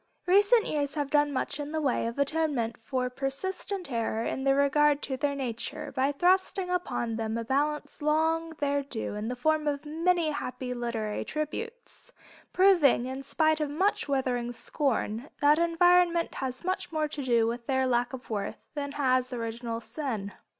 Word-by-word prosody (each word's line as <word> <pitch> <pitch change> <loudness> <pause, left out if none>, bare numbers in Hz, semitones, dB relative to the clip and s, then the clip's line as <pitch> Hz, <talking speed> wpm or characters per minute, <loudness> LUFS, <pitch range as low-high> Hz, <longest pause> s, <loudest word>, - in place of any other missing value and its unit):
Recent 410 +5 +5
years 285 -1 -1
have 290 -2 -2
done 295 -1 +3
much 280 +1 -2
in 295 +1 -5
the 315 - 0
way 270 -5 +1
of 230 - -5
atonement 280 -5 0
for 250 +2 -1
persistent 280 +7 -3
error 230 -1 -1
in 265 - -2
regard 280 +1 +3
to 265 - -2
their 280 +1 -1
nature, 245 -4 -4
by 265 +2 +1
thrusting 365 +4 +2
upon 240 -10 -1
them 225 0 -2
a 230 - -2
balance 290 +4 -1
long 320 +2 +1
their 285 0 +1
due 265 -7 -5
in 210 +1 -4
the 250 - -2
form 310 +4 +1
of 290 0 -1
many 330 +1 +1
happy 250 -3 -4
literary 235 -3 -3
tributes, 455 - -6 0.4
proving, 350 -10 +5
in 260 +1 -4
spite 315 +2 +2
of 300 -2 -1
much 370 +6 0
withering 255 -3 0
scorn, 245 -1 -2
that 295 +2 +5
environment 340 0 +3
has 255 +1 -4
much 370 -1 -2
more 310 -1 0
to 295 -1 -5
do 235 -4 +3
with 235 +1 -3
their 265 -1 +2
lack 245 -1 +1
of 260 -1 -8
worth 205 -2 -3 0.2
than 285 -1 -4
has 255 -3 +1
original 230 -1 -4
sin. 230 -6 -4
280 Hz, 170 wpm, -28 LUFS, 245-315 Hz, 0.4 s, Recent